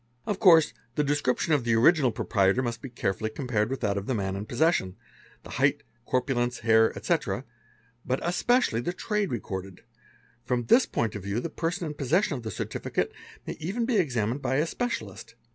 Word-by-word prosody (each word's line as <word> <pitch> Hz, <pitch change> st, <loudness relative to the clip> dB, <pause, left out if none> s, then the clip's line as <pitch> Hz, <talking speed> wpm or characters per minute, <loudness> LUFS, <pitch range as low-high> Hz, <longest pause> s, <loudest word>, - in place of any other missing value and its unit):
"Of 200 Hz, -2 st, -2 dB
course 165 Hz, -6 st, +6 dB, 0.2 s
the 150 Hz, -, +2 dB
description 145 Hz, +1 st, +1 dB
of 145 Hz, -4 st, +2 dB
the 115 Hz, -1 st, +2 dB
original 130 Hz, +2 st, +5 dB
proprietor 100 Hz, +2 st, +1 dB
must 115 Hz, -2 st, -3 dB
be 135 Hz, -, -7 dB
carefully 110 Hz, -3 st, -2 dB
ompared 115 Hz, -5 st, 0 dB
with 135 Hz, -, -4 dB
that 100 Hz, -1 st, 0 dB
of 100 Hz, -, -9 dB
the 130 Hz, -, 0 dB
man 95 Hz, -2 st, -2 dB
in 100 Hz, +2 st, -5 dB
possession, 120 Hz, -, +1 dB, 0.5 s
the -, -, -11 dB
height, -, -, +1 dB, 0.2 s
corpulence, 125 Hz, -1 st, 0 dB
hair, 110 Hz, -1 st, +4 dB
etc.; -, -, -1 dB, 0.6 s
but 130 Hz, +1 st, -1 dB
especially 180 Hz, -, +2 dB
the 175 Hz, -, -2 dB
trade 210 Hz, +1 st, -1 dB
recorded: 95 Hz, -5 st, -5 dB, 0.6 s
from 125 Hz, 0 st, -1 dB
this 245 Hz, -, +5 dB
point 115 Hz, -3 st, -1 dB
of 105 Hz, -, -5 dB
view 100 Hz, +4 st, -2 dB
the 160 Hz, +6 st, -4 dB
erson 175 Hz, +3 st, -2 dB
in 150 Hz, -, -4 dB
possession 150 Hz, -, +1 dB
of 125 Hz, -, -5 dB
the 110 Hz, -, -5 dB
certificate 95 Hz, -, -3 dB, 0.3 s
may -, -, -4 dB
even 195 Hz, +9 st, -2 dB
be 235 Hz, -2 st, +1 dB
examined 125 Hz, -, 0 dB
by 130 Hz, -, 0 dB
a 150 Hz, +3 st, +2 dB
specia 245 Hz, -, -2 dB
'list. 110 Hz, +3 st, -12 dB
125 Hz, 190 wpm, -27 LUFS, 110-165 Hz, 0.6 s, course